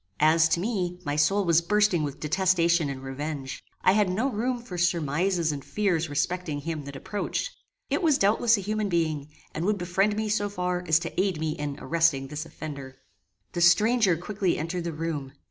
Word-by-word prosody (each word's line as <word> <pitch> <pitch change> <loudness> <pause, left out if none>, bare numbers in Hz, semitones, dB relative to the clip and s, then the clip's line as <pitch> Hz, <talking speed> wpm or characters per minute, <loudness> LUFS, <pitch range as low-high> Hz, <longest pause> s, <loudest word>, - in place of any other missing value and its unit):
As 160 +1 +5
to 165 - +2
me, 180 -4 -2
my 145 -1 -1
soul 195 +7 +2
was 170 -1 +4
bursting 205 -1 +2
with 145 -2 -4
detestation 170 -1 +2
and 135 -1 -6
revenge. 135 0 -5 0.2
I - - +6
had 205 -1 +3
no 225 +9 0
room 245 +3 -1
for 235 -6 -9
surmises 170 0 +1
and 140 -2 -5
fears 175 -6 0
respecting 155 0 -2
him 160 -2 -4
that 140 0 -8
approached. 205 - -3 0.4
It - - +1
was 310 -5 +3
doubtless 220 +3 +3
a - - -3
human 215 +1 -1
being, 160 -5 0 0.3
and 160 - -3
would 205 +2 +1
befriend 190 +3 +1
me 220 0 -1
so 205 -1 0
far 180 -2 -2
as 160 - +5
to 170 +1 -2
aid 190 -5 -1
me 155 0 -1
in 145 -2 -4
arresting 160 -5 +1
this 150 +2 -5
offender. 140 -4 -8 0.5
The 175 - -3
stranger 205 +1 +4
quickly 190 +1 -1
entered 170 +2 -3
the 170 - -2
room. 150 -4 -4
170 Hz, 190 wpm, -26 LUFS, 155-200 Hz, 0.5 s, I